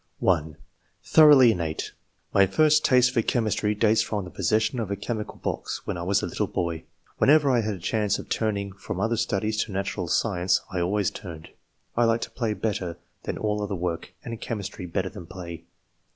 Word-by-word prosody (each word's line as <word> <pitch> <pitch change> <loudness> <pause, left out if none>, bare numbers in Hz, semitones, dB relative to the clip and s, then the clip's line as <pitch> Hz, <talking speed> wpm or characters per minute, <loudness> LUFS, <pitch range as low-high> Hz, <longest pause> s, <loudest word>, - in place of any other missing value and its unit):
(1) 80 -4 +1 0.5
Thoroughly 145 -6 +7
innate. 85 -6 -3 0.4
My 100 -1 +5
first 155 +8 +4
taste 125 -2 +4
for 120 -2 +2
rliomistr}^ 110 -2 0
dates 110 0 +4
from 105 -3 -2
the 90 - -10
possession 110 +6 +1
of 110 -4 -3
a 100 - -1
che 100 +4 -3
mical 105 -2 -6
box, - - -3
when - - -3
I 85 - -5
was 95 +3 +1
a - - +1
little - - -2
boy. 85 -2 -3 0.3
Whenever 145 -1 +5
I 120 -2 +3
had 105 -1 -2
a - - -10
chance 105 +3 0
of - - -8
turning 100 -3 -1
from 100 - -6
other 115 +1 +1
studies 110 -1 0
to 110 - -10
natural 95 -2 -3
science, 90 0 +1
I 90 - -2
always 100 +2 +1
turned. 85 -4 -9 0.5
I 120 - +3
liked 115 0 0
])hiy 115 -4 -1
l)etter 100 -7 -2 0.3
than - - -3
all 105 -1 -1
other 100 -1 -2
work, 85 -1 -3
and 115 -1 -6
chemistry 100 -4 -5
better 95 +2 -2
than 85 - -10
play." 85 -3 -8
105 Hz, 195 wpm, -26 LUFS, 90-115 Hz, 0.5 s, Thoroughly